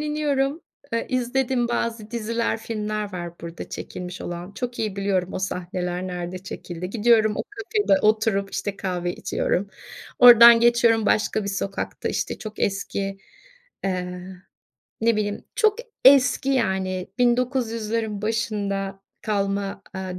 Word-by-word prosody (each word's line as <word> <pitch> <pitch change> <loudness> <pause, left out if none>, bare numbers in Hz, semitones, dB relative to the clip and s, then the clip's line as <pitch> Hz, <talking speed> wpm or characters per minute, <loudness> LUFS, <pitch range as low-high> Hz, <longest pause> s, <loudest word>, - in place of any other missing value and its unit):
iniyorum, 295 0 0 0.3
eee, 230 - -1
izlediğim 255 -1 0
bazı 230 -2 -2
diziler, 230 0 -1
filmler 215 -2 -4
var 175 -1 -7
burada 170 0 -7
çekilmiş 180 0 -7
olan. 175 +2 -6
Çok 245 +2 -5
iyi 210 -3 -2
biliyorum 195 -2 0
o - - -3
sahneler 180 -1 -3
nerede 180 0 -5
çekildi. 180 -1 -7
Gidiyorum, 220 -1 +4
o - - -1
kafede 410 -6 +1
oturup, 215 -2 +2
işte, 205 -1 -3
kahve 180 -2 -2
içiyorum. 200 +3 -1 0.5
Oradan 235 -1 +10
geçiyorum 235 -2 +4
başka 215 0 +2
bir 200 - -3
sokakta, 195 0 -3
işte, - - -2
çok 215 -2 -8
eski, 195 0 -2 0.7
eee, 180 -1 -2 0.8
ne 230 -1 +3
bileyim, 205 -1 -2
çok 435 -2 +3 0.3
eski 265 0 +6
yani, 190 -7 0
1900’lerin 230 -4 0
başında 200 -3 -2 0.2
kalma, 200 -1 -1
aaa, 185 -1 -5
210 Hz, 125 wpm, -24 LUFS, 190-235 Hz, 0.8 s, Oradan